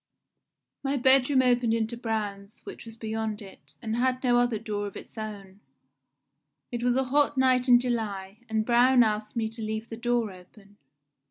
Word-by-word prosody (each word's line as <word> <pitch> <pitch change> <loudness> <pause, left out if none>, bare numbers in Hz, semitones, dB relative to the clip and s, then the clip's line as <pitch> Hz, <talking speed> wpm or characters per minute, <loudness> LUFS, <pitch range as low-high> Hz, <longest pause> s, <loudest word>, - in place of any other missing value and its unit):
My 275 0 -1
bedroom 260 +1 +4
opened 245 -2 +2
into 225 +1 -2
Braun's, 215 -3 -5
which - - -10
was 225 - -10
beyond 220 -1 -3
it, 195 -2 -14
and 225 0 -2
had 255 +1 0
no 245 -1 +3
other 245 -2 +1
door 205 -1 -4
of 200 - -9
its - - -12
own. 205 -3 -8 1.1
It 240 -1 -4
was 245 0 +2
a 265 - +2
hot 285 +2 +1
night 255 -1 +3
in 245 -1 +8
July, 215 -5 -3
and 220 -1 0
Braun 245 +1 +5
asked 215 +1 -2
me 225 -1 0
to 225 +1 -9
leave 220 +1 -4
the 225 - -7
door 240 -2 0
open. 195 +3 -17
225 Hz, 175 wpm, -27 LUFS, 215-245 Hz, 1.1 s, in